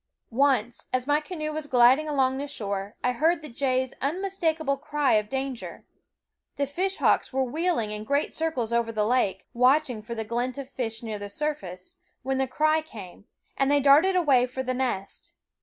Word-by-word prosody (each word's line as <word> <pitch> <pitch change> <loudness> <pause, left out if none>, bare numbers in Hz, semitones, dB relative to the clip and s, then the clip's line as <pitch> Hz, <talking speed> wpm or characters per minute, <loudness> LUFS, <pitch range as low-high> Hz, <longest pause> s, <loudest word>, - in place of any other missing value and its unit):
Once, 245 -2 +1
as 255 0 0
my 290 +1 +3
canoe 305 -1 -5
was 310 -1 -4
gliding 260 +4 +5
along 265 -2 +1
the 285 - -3
shore, 200 -6 -4
I 250 - +2
heard 320 +6 +1
the 300 - -7
jays' 260 +1 0
unmistakable 320 -2 0
cry 290 0 0
of 210 -1 +2
danger. 265 -2 -5 0.7
The 280 - 0
fishhawks 370 +8 +1
were 265 0 +1
wheeling 295 -4 -1
in 210 0 -4
great 280 +6 0
circles 265 -8 -2
over 235 -1 +1
the 215 -2 0
lake, 235 -4 +1
watching 255 -1 +3
for 235 +2 -7
the 225 - -3
glint 245 +4 -2
of 275 -2 -6
fish 225 -3 -4
near 215 -2 -4
the 205 0 -6
surface, 200 -9 -5 0.3
when 265 +1 -1
the 265 - +1
cry 310 +4 +2
came, 205 - -11 0.3
and 275 0 +1
they 290 0 +4
darted 290 +7 +5
away 275 -8 +4
for 260 +1 -4
the 255 0 -1
nest. 245 -7 -3
265 Hz, 180 wpm, -26 LUFS, 235-295 Hz, 0.7 s, gliding